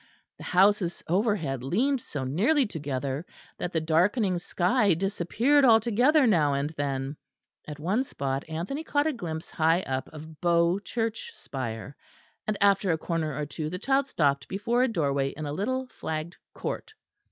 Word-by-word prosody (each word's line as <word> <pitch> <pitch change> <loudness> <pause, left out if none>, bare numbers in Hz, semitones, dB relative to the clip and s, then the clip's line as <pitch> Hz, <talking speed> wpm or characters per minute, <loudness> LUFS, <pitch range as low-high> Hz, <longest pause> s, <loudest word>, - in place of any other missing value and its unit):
The - - -9
houses 190 -1 +3
overhead 175 - 0
leaned 245 - +1
so 145 -10 -5
nearly 225 - +2
together 140 - -3 0.4
that 175 - -3
the 165 - +1
darkening 180 +5 +2
sky 185 +3 +2
disappeared 205 - +2
altogether 245 +5 +5
now 155 - +3
and 140 +2 -1
then; 140 -1 -3 0.5
at 150 -1 -6
one 195 - +1
spot 135 - -3
Anthony 180 - -3
caught 290 -2 +1
a 315 - +1
glimpse 165 -9 -6
high 165 +2 +2
up 130 -5 -3
of 155 0 -11
Bow 170 +1 +3
Church 225 - -3
spire; 130 0 -6 0.5
and 215 -1 0
after 200 -2 +4
a 160 - +1
corner 160 -3 -2
or 150 - -2
two 155 +1 -4
the 180 - -4
child 270 +6 +1
stopped 140 - +1
before 235 +5 0
a 255 - +4
doorway 140 - 0
in 155 - -4
a 145 - -3
little 260 +10 -1
flagged 160 -2 -5 0.2
court. 440 -1 -5
175 Hz, 160 wpm, -27 LUFS, 150-225 Hz, 0.5 s, altogether